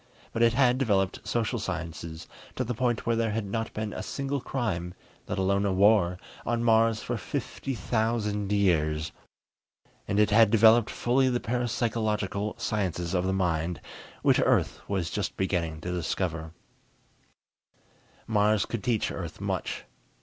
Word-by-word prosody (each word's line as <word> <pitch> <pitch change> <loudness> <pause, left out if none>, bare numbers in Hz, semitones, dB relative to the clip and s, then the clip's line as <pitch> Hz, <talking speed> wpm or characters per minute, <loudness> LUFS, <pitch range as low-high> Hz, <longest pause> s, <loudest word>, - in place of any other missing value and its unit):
But 115 - -1
it 115 -1 +5
had 125 0 +3
developed 100 -7 0
social 120 0 0
sciences 85 -3 -5 0.3
to 130 - -1
the 125 0 -2
point 120 0 0
where 115 - +2
there 115 0 +1
had 110 0 -2
not 110 +3 -3
been 110 -1 -4
a - - -4
single 140 0 -3
crime, 90 -11 -3 0.3
let - - -3
alone 100 +1 +2
a 100 - +1
war, 95 -2 +4 0.3
on 120 0 -1
Mars 115 -1 +3
for 120 - -2
fifty 135 +6 -4
thousand 110 -3 -1
years. 80 -6 +1 1.0
And 100 - +1
it 105 0 +4
had 110 0 +6
developed 115 +1 +6
fully 130 +2 +2
the 120 -1 0
parapsychological 110 -4 -1
sciences 90 -4 -2
of 90 -1 +1
the - - +1
mind, 85 -3 0 0.4
which - - +4
Earth - - +2
was 95 -4 -1
just 100 -1 -3
beginning 85 -4 -1
to 90 - -4
discover. 85 -2 -2 1.7
Mars 105 -1 +2
could 115 -4 -4
teach 115 -4 0
Earth 85 -4 -6
much. - - -3
105 Hz, 150 wpm, -28 LUFS, 90-115 Hz, 1.7 s, had